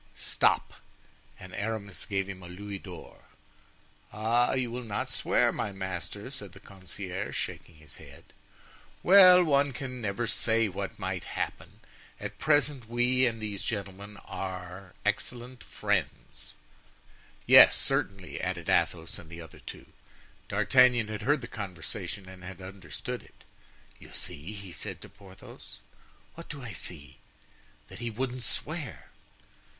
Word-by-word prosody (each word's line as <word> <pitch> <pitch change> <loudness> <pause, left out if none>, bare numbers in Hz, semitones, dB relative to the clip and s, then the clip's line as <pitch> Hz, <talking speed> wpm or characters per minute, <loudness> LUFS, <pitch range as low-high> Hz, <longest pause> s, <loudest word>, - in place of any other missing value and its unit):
"Stop," - - +2 0.7
and 95 0 -10
Aramis 100 -2 -3
gave 95 -2 0
him 95 -1 -7
a 90 - -9
louis 100 +2 -6
d'or. 90 -4 -11 0.9
"Ah! 115 +3 +2
you 130 -2 0
will 125 +1 -3
not 105 -3 -2
swear, - - +3
my 105 - -2
master," 95 +4 -5
said 100 -9 -3
the 100 - -12
concierge, 95 0 -5
shaking 85 - -5
his 75 -2 -9
head. - - -13 0.8
"Well, 180 -1 +9
one 140 -3 +3
can 125 -1 -5
never 110 +2 -1
say 115 0 +2
what 95 - -4
may - - -2
happen; - - -5 0.4
at - - -6
present 145 -5 +2
we 125 +2 +3
and 115 -1 -2
these 105 -3 -4
gentlemen 100 -1 -4
are 95 -1 -6
excellent 125 +1 -2
friends." - - -2 0.9
"Yes, - - +10
certainly," 95 -4 -1
added - - -2
Athos 80 0 +1
and 80 - -12
the 85 0 -8
other 80 - -12
two. - - -9 0.6
D'Artagnan 125 -4 +5
had 110 0 -4
heard 140 +5 +2
the 120 - -6
conversation 95 0 -4
and 95 -1 -11
had 95 0 -8
understood 95 -4 -6
it. - - -20 0.6
"You - - -13
see?" 80 +9 -5
he 100 -3 -8
said - - -5
to - - -10
Porthos. 100 -2 -13 0.6
"What 165 - -11
do 145 -4 -7
I 115 - -6
see?" 75 -4 -4 0.7
"That - - -10
he 120 0 -2
wouldn't 125 +2 -3
swear." 150 +1 -3
105 Hz, 140 wpm, -30 LUFS, 95-120 Hz, 0.9 s, Yes